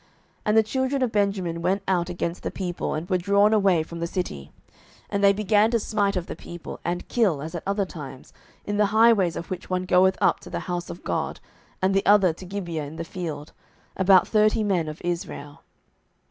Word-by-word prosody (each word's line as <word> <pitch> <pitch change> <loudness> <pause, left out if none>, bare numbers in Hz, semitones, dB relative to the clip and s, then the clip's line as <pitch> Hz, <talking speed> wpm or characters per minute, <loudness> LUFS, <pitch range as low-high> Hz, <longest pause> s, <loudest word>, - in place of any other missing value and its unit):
07:020:031 - - -33 0.4
And 210 +1 +3
the 220 - +6
children 260 +4 -1
of 245 - 0
Benjamin 195 -5 0
went 190 +3 0
out 180 -2 +1
against 175 0 -3
the - - -3
people, 180 -4 -3
and 155 +3 -4
were 185 -2 +1
drawn 200 +3 +3
away 195 -6 +3
from 170 +1 -9
the 170 - -2
city; 75 - -4 0.6
and 200 -1 -1
they 200 - +7
began 210 +1 +3
to 235 0 +1
smite 205 -2 0
of 180 -2 -2
the - - -7
people, 175 -1 -9
and 175 +1 -3
kill, 205 - +1
as 155 +3 -6
at 170 - -4
other 200 0 0
times, 140 -7 -10 0.3
in 205 0 -2
the 210 -1 +4
highways, 220 -7 +5
of 170 - -7
which 185 -1 -5
one 185 0 -1
goeth 190 0 +4
up - - +3
to - - -12
the - - -4
house 175 -1 -4
of 175 - -9
God, - - -2 0.4
and 190 +1 +3
the 195 - +2
other 195 -4 +5
to 185 - -11
Gibeah 175 -5 -4
in 145 +3 -9
the 165 - -4
field, 160 -4 -6 0.4
about 190 -1 +5
thirty 215 0 +3
men 185 -6 0
of 155 0 -6
Israel. 170 -4 -5
185 Hz, 215 wpm, -25 LUFS, 170-205 Hz, 0.6 s, they